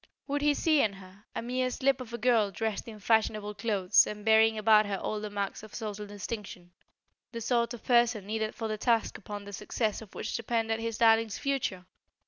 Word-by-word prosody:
Would 285 0 -2
he 295 0 +3
see 310 -2 +3
in 210 - +1
her, 195 +1 -15
a - - -3
mere 255 +1 -1
slip 265 +1 +1
of 240 -2 -8
a 235 - -4
girl 230 -3 +3
dressed 215 +4 -3
in 220 -2 -8
fashionable 215 -1 +1
clothes 200 -3 +3
and 210 0 -7
bearing 220 0 +5
about 215 -1 +5
her 200 -1 -2
all 210 +2 -3
the 210 - -4
marks 200 -1 -3
of 215 -1 -12
social 210 -2 -5
distinction, 200 -3 -7 0.6
the 230 - -5
sort 235 0 +1
of 230 - -14
person 235 -4 +3
needed 220 +1 -2
for 225 - -3
the 215 -1 -3
task 230 -1 +1
upon 205 0 -7
the 205 - -9
success 215 +2 -2
of 215 - -13
which - - -4
depended 225 -1 -1
his 225 -1 -3
darlings' 225 -2 +4
future? 260 -10 -2
220 Hz, 205 wpm, -29 LUFS, 205-235 Hz, 0.6 s, bearing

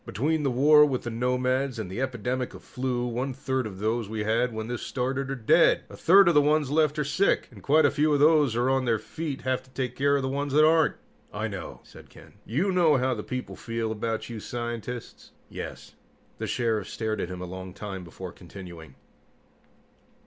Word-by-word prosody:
"Between 150 +10 -1
the 140 - +1
war 150 +4 +6
with 135 -4 0
the 120 - -4
nomads 125 +2 0
and 110 -4 -4
the 95 +8 -5
epidemic 125 0 -2
of - - -12
flu, 125 -1 -2
one 125 +2 -3
third 130 -3 -2
of 95 -3 -9
those 110 +1 -1
we 110 -1 -3
had 115 +3 +1
when 110 0 -5
this 120 -1 -4
started 135 +1 -2
are 135 - -2
dead. 115 -4 +4
A - - -9
third 195 +2 +6
of 170 - +5
the 150 - +6
ones 150 -1 +2
left 150 -1 +2
are 150 - +1
sick, 185 +8 +1
and 105 -5 -13
quite 155 +9 +4
a 145 - +4
few 150 +1 +2
of 145 - +3
those 150 -5 +4
on 130 +2 +2
their 115 -2 +2
feet 145 +6 -5
have 130 0 -1
to 130 - -23
take 130 -1 -4
care 140 +1 +2
of 140 - 0
the - - -1
ones 140 +1 -2
that 155 +1 +6
aren't." 160 -1 +4 0.4
"I - - -3
know," - - -7
said - - -15
Ken. - - -16
"You 170 - 0
know 170 -6 +4
how 130 0 +1
the 110 - -4
people 125 +3 -5
feel 115 -1 -3
about 110 +1 -3
you 115 -2 -6
scientists?" 120 +1 -6 0.2
"Yes." - - -8 0.5
The - - -3
Sheriff 115 -4 -1
stared 110 -1 -2
at 90 - -3
him 90 -1 -6
a - - -4
long 95 +1 -7
time 100 -1 -7
before 90 +2 -8
continuing. 85 -6 -11
125 Hz, 215 wpm, -27 LUFS, 110-140 Hz, 0.5 s, war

